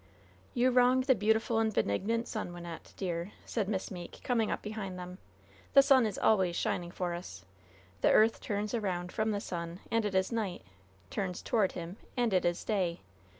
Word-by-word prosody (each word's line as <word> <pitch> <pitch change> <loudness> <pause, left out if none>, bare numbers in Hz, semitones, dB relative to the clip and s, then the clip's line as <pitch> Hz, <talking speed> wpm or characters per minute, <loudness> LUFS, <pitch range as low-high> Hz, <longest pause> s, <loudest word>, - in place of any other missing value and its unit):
"You 250 +1 +4
wrong 250 +1 +5
the 260 +1 +4
beautiful 220 +1 +2
and 220 -1 +2
benignant 220 - 0
sun, 215 -5 -4
Wynnette, 175 -1 -9
dear," 175 0 -3
said 210 -4 -1
Miss 190 -3 -2
Meeke, 175 -2 -8
coming 230 -3 +1
up - - -2
behind 210 -3 -5
them. 180 +1 -8 0.5
"The 275 - +9
sun 265 -4 +5
is 205 - -4
always 190 -5 +3
shining 175 0 -1
for 175 0 -3
us. 175 +1 -8 0.6
The - - +5
earth 220 +1 +5
turns 210 +1 -2
around 180 -6 -2
from 220 -1 0
the 205 -1 0
sun, 170 -3 -5
and 230 0 +2
it 205 -2 -2
is 190 +3 +2
night 215 -6 -2 0.5
turns 185 -2 -3
toward 210 -5 +2
him, 175 +2 -6 0.2
and 240 -4 +2
it 185 - +3
is 175 0 0
day. 185 -6 0
200 Hz, 185 wpm, -31 LUFS, 180-225 Hz, 0.6 s, The